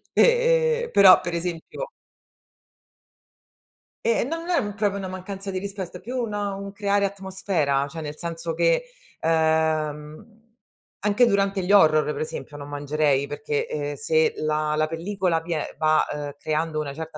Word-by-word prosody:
E -, -, +6 dB, 0.6 s
e -, -, -8 dB
però 195 Hz, -2 st, +8 dB
per 175 Hz, 0 st, -4 dB
esempio 175 Hz, -, -4 dB, 2.1 s
Eh 230 Hz, 0 st, +2 dB
no, 325 Hz, +6 st, -3 dB
non 335 Hz, +2 st, -8 dB
è 350 Hz, -, +3 dB
m 205 Hz, -1 st, -4 dB
proprio 205 Hz, -2 st, 0 dB
una 190 Hz, -1 st, -4 dB
mancanza 190 Hz, +1 st, -6 dB
di 190 Hz, -, -3 dB
rispetto, 190 Hz, -2 st, -5 dB
è -, -, -14 dB
più 250 Hz, +3 st, -6 dB
un 230 Hz, -4 st, -2 dB
un 200 Hz, -1 st, -3 dB
creare 200 Hz, 0 st, +1 dB
atmosfera, 190 Hz, -8 st, -1 dB
cioè 160 Hz, +2 st, -7 dB
nel 150 Hz, 0 st, -6 dB
senso 165 Hz, 0 st, -4 dB
che, -, -, +2 dB, 0.4 s
ehm, 160 Hz, +5 st, 0 dB, 0.6 s
anche 210 Hz, +4 st, +3 dB
durante 200 Hz, -3 st, +1 dB
gli 190 Hz, -, -1 dB
horror, 155 Hz, -6 st, +6 dB
pre -, -, -5 dB
esempio, 155 Hz, -1 st, -6 dB
non 145 Hz, 0 st, -8 dB
mangerei, 145 Hz, -1 st, +1 dB
perché, 145 Hz, 0 st, -3 dB
ehm, 145 Hz, -1 st, -3 dB
se 160 Hz, +3 st, +2 dB
la 155 Hz, 0 st, 0 dB
la 155 Hz, 0 st, +2 dB
pellicola 170 Hz, 0 st, -1 dB
vie 165 Hz, -2 st, -3 dB
va, 155 Hz, 0 st, +3 dB
uhm, 145 Hz, -1 st, -5 dB
creando 155 Hz, +1 st, -1 dB
una 140 Hz, -2 st, -4 dB
certa 160 Hz, 0 st, -7 dB
170 Hz, 160 wpm, -24 LUFS, 155-200 Hz, 2.1 s, però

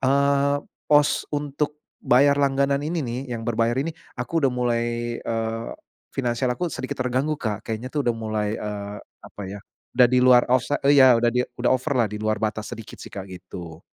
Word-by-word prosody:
eee, 140 Hz, +1 st, +3 dB, 0.3 s
pos 145 Hz, -1 st, +3 dB
untuk 145 Hz, 0 st, -2 dB, 0.3 s
untuk -, -, -10 dB
bayar 140 Hz, +3 st, +6 dB
langganan 140 Hz, 0 st, +1 dB
ini 165 Hz, +3 st, -2 dB
nih, 125 Hz, -4 st, -3 dB
yang 115 Hz, -1 st, -4 dB
berbayar 115 Hz, +2 st, +1 dB
ini, 155 Hz, +4 st, -2 dB, 0.2 s
aku 150 Hz, +6 st, -1 dB
udah 135 Hz, -, +4 dB
mulai, 120 Hz, -1 st, 0 dB, 0.4 s
eee, 115 Hz, 0 st, -2 dB, 0.4 s
finansial 125 Hz, -1 st, -1 dB
aku 175 Hz, +9 st, -1 dB
sedikit 130 Hz, -6 st, -5 dB
terganggu, 130 Hz, +4 st, 0 dB
Kak, 105 Hz, -4 st, -3 dB
kayaknya 115 Hz, +2 st, -4 dB
tuh 145 Hz, -, +1 dB
udah 120 Hz, -, +2 dB
mulai, 110 Hz, -1 st, -2 dB
eee, 105 Hz, -1 st, -5 dB, 0.3 s
apa 105 Hz, -, -10 dB
ya, 100 Hz, +1 st, -8 dB, 0.3 s
udah 125 Hz, 0 st, +7 dB
di 125 Hz, -, +4 dB
luar 125 Hz, -1 st, +6 dB
offsi 130 Hz, +3 st, +2 dB, 0.2 s
ya 130 Hz, -3 st, +8 dB
udah 120 Hz, 0 st, +3 dB
di 125 Hz, +1 st, 0 dB, 0.2 s
udah 120 Hz, -, +3 dB
over 130 Hz, +3 st, +1 dB
lah 120 Hz, -4 st, +2 dB
di 105 Hz, -, -5 dB
luar 110 Hz, 0 st, -1 dB
batas 110 Hz, +2 st, -2 dB
sedikit 115 Hz, -2 st, -11 dB
sih, -, -, -10 dB
Kak, 100 Hz, -, -7 dB
gitu. 90 Hz, -3 st, -9 dB
125 Hz, 190 wpm, -24 LUFS, 110-140 Hz, 0.4 s, ya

